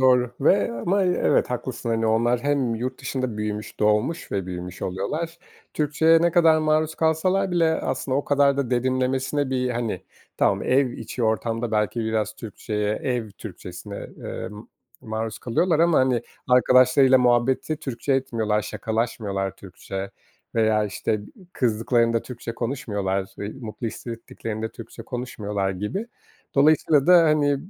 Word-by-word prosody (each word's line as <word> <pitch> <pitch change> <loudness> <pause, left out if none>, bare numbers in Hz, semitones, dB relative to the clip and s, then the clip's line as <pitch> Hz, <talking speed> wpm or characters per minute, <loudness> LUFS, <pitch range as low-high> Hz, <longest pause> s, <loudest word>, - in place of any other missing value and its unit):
Doğru. 125 -2 +4
Ve 150 0 +3
ama, 175 - 0
eee, 180 -1 +1
evet - - +3
haklısın. 125 -1 -4
Hani, 115 0 +1
onlar 120 +2 +2
hem 140 -5 +1
yurt 125 +3 -4
dışında 130 -4 -3
büyümüş, 105 0 -4
doğmuş 105 +10 +1
ve 95 -2 -1
büyümüş 90 0 -6
oluyorlar. 155 - -3 0.4
Türkçeye 160 +2 +3
ne 170 - +4
kadar 165 -2 +5
maruz 155 0 +1
kalsalar 185 +5 +1
bile 165 -2 +3
aslında 130 -1 -2
o 140 - -1
kadar 140 -1 +3
da 140 -3 -1
derinlemesine 130 +2 0
bir, 125 -1 0
hani, 120 -2 -2 0.3
tamam - - +2
ev 130 0 +2
içi 120 +2 -6
ortamda 115 +1 0
belki 105 +2 0
biraz 110 -1 -1
Türkçeye, 105 -1 -3
ev 120 -3 -2
Türkçesine, 100 0 -9 0.2
ııı, - - -6
ma 105 +1 -10 0.4
maruz 110 0 -4
kalıyorlar 160 +7 +1
ama, 170 -1 +4
hani, 130 -3 +2 0.3
arkadaşlarıyla 130 +1 +5
muhabbeti 125 +5 +2
Türkçe 135 -1 -3
etmiyorlar, 115 -5 0
şakalaşmıyorlar 105 -3 -2
Türkçe 95 +1 -7 0.4
veya, 110 -1 +3
işte, 105 +1 -1
ı 105 -1 -4 0.3
kızdıklarında 115 0 +1
Türkçe 120 -2 -7
konuşmuyorlar, 105 -6 -2 0.2
ı - - -5 0.2
mutlu 115 0 -5
hissettiklerini 115 -1 -5
Türkçe 115 +1 -10
konuşmuyorlar 105 -5 -3
gibi. 105 - -3 0.5
Dolayısıyla 145 0 +4
da, 180 -1 +8
hani, 150 -2 +3
120 Hz, 140 wpm, -24 LUFS, 110-140 Hz, 0.5 s, da